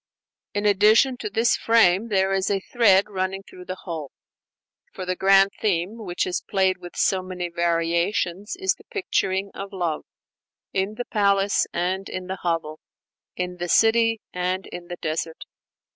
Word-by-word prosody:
In 205 0 -1
addition 210 +6 +5
to 210 - -4
this 225 +3 +2
"frame," 225 -2 +3
there 195 -2 +1
is 190 0 0
a 200 -1 +1
thread 200 -2 +3
running 190 -1 -3
through 180 -1 -13
the 185 +1 -5
whole; 160 -6 -5 0.8
for 185 - -7
the 185 0 -1
grand 195 +1 +5
theme 200 +2 0
which 180 -5 -2
is 180 - -2
played 190 -2 +1
with 175 -1 -10
so 190 -1 +2
many 180 -1 -5
variations 170 - 0
is 380 0 +1
the - - -19
picturing 195 - -1
of 195 0 -7
love 175 -5 -2 0.7
in 195 +2 -1
the 245 - -4
palace 200 -1 +2
and 185 +2 -2
in 185 0 -5
the 190 0 -5
hovel, 165 -3 -2 0.6
in 180 0 -4
the 175 0 -4
city 225 +1 +4
and 180 +1 -2
in 175 -1 -9
the 175 0 -6
desert. 160 0 -3
190 Hz, 160 wpm, -24 LUFS, 180-205 Hz, 0.8 s, addition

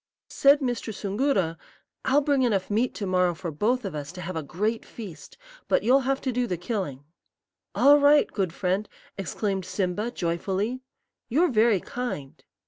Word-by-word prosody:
"Said 280 +1 +5
Mr. 245 -3 -2
Soongoora, 200 - 0 0.5
'I'll 280 +3 +4
bring 285 -2 +2
enough 210 -6 +1
meat 230 +4 +1
to 205 - -3
morrow 180 -2 +2
for 170 +1 -5
both 225 - 0
of 195 - -4
us 145 0 -5
to 180 - -8
have 180 +1 -5
a 160 - -1
great 210 +10 -2
feast, 200 -9 -10 0.3
but - - +2
you'll 255 +5 +5
have 270 0 +1
to 260 - -1
do 245 0 0
the 180 -4 -2
killing.' 175 - -4 0.7
"'All 290 +1 +6
right, 290 +1 +6
good 190 -5 -2
friend,' 190 +4 -1 0.3
exclaimed 195 +1 -2
Simba, 185 +4 -2
joyfully; 195 +6 -2 0.5
'you're 320 +9 +3
very 220 -3 +4
kind.' 175 - -6
205 Hz, 165 wpm, -26 LUFS, 180-250 Hz, 0.7 s, All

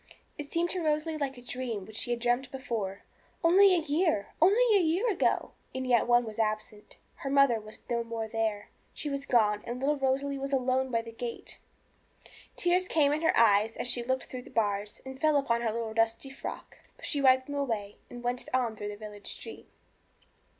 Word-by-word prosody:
It 290 -1 -8
seemed 340 +1 +1
to 365 - -1
Rosalie 310 +1 0
like 270 -2 -2
a 245 - -12
dream 245 -5 -4
which 220 - -12
she 235 - -1
had 240 0 0
dreamt 245 +2 0
before. 225 -7 -4 0.4
Only 375 +3 +6
a - - +3
year 315 - +1
only 430 +6 +5
a - - +6
year 350 +8 +1
ago! 380 - +1 0.2
And 260 0 -2
yet 245 -2 +3
one 240 0 +4
was 220 0 -7
absent; 215 -1 -3 0.2
her 275 - -5
mother 275 -4 +4
was 215 0 -11
no 235 -1 0
more 230 -1 -4
there; 220 -2 -2 0.3
she 295 - -4
was 275 0 -4
gone 210 -4 +3
and 240 +1 -5
little 290 +3 +1
Rosalie 275 +1 0
was 275 +1 -4
alone 260 0 +1
by 230 -2 0
the 230 - -9
gate! 235 +1 -7 1.0
Tears 360 +1 +2
came 295 -4 +3
in 305 - -1
her 325 - +2
eyes 220 -1 +4
as - - -3
she 245 0 +1
looked 260 +2 -1
through 255 - -7
the - - -14
bars, 205 -2 -1
and 265 0 -9
fell 310 -1 +4
upon 235 -4 +1
her 230 -2 0
little 225 0 -3
dusty 225 +4 0
frock. 270 - -8 0.2
But - - -10
she 285 - 0
wiped 260 -1 +5
them 285 - -7
away, 225 -8 -2
and 245 0 -9
went 245 +1 -2
on 240 -4 0
through 205 0 -5
the 205 - -7
village 210 -1 -9
street. - - -7
250 Hz, 205 wpm, -29 LUFS, 225-285 Hz, 1.0 s, Only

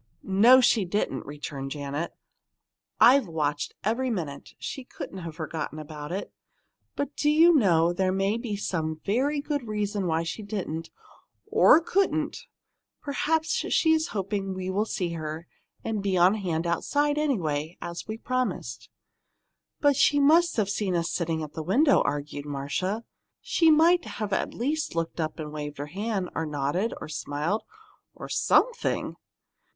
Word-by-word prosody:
"No, 230 +7 +6
she 235 -4 +4
didn't," 175 -8 -2
returned 145 -1 -6
Janet. 145 +3 -4 0.9
"I've 260 -1 +6
watched 150 -3 -2
every 235 +5 0
minute. 160 -11 -5
She 270 - -6
couldn't 195 -6 -8
have 165 -3 -7
forgotten 155 -1 -5
it. 155 +4 -6 0.6
But, 285 0 -3
do 295 - +1
you 325 +3 +6
know, 175 - +4
there 185 +1 +1
may 195 +3 +1
be 230 -4 -3
some 160 -5 -2
very 275 +8 +1
good 285 -4 -3
reason 205 -2 -2
why 165 0 +1
she 170 +6 -5
didn't 190 -6 -4 0.6
or 430 -7 +6
couldn't 380 +4 +1
and - - -6 0.6
perhaps 310 +2 0
she's 320 -8 +2
hoping 195 - -3
we'll 190 +3 -1
see 180 -5 -2
her, 160 0 -5 0.4
and 220 -2 -2
be 195 -2 0
on 180 +3 +6
hand 175 -6 -2
outside, 290 - +1
anyway, 165 - -1
as 170 0 -6
we 220 0 -4
promised." 255 +2 -3 0.9
"But 285 -1 +4
she 290 +2 +4
must 325 +3 +4
have 200 -2 +1
seen 195 -3 -1
us 165 -1 0
sitting 165 -2 -1
in 155 - -5
the 160 - -4
window," 265 - +4
argued 145 0 -3
Marcia. 145 +10 -2 0.4
"She 330 -1 +3
might 330 0 +4
at 205 -3 -1
least 295 +6 -1
have - - -14
looked 165 0 -2
up 155 -1 -2
and 155 -2 -6
waved 150 -1 -5
her 145 - -4
hand, 195 +3 -3
or 160 - -2
nodded, 150 +9 -1
or - - -7
smiled 155 +6 -2 0.5
or - - -8
something!" 485 -1 +1
195 Hz, 150 wpm, -27 LUFS, 160-255 Hz, 0.9 s, No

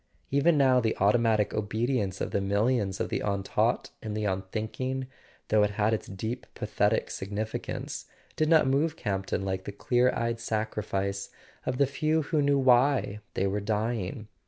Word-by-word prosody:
Even 145 +4 +4
now, 130 -2 +5
the 110 -2 0
automatic 110 0 +3
obedience 110 -2 -1
of - - -2
the 100 - 0
millions 100 0 +1
of - - -1
the - - -1
untaught 100 -2 0
and 105 -1 -4
the 105 - -1
unthinking, 110 +7 -2 0.4
though 110 0 +4
it 105 - +3
had 105 +1 +2
its 110 - -2
deep 110 +6 -5
pathetic 105 0 0
significance, 105 +3 -4 0.3
did 155 0 +1
not 160 -4 +6
move 145 +4 +1
Campton 95 -1 -2
like 95 -1 -2
the - - -4
clear 125 +5 +2
eyed 115 0 -1
sacrifice 100 -3 -2 0.4
of 125 - 0
the 140 - +4
few 155 +4 0
who 150 +1 +1
knew 140 0 +3
why 130 -4 +3 0.2
they 95 - +1
were 100 +1 0
dying. 110 -1 -2
110 Hz, 160 wpm, -28 LUFS, 100-130 Hz, 0.4 s, not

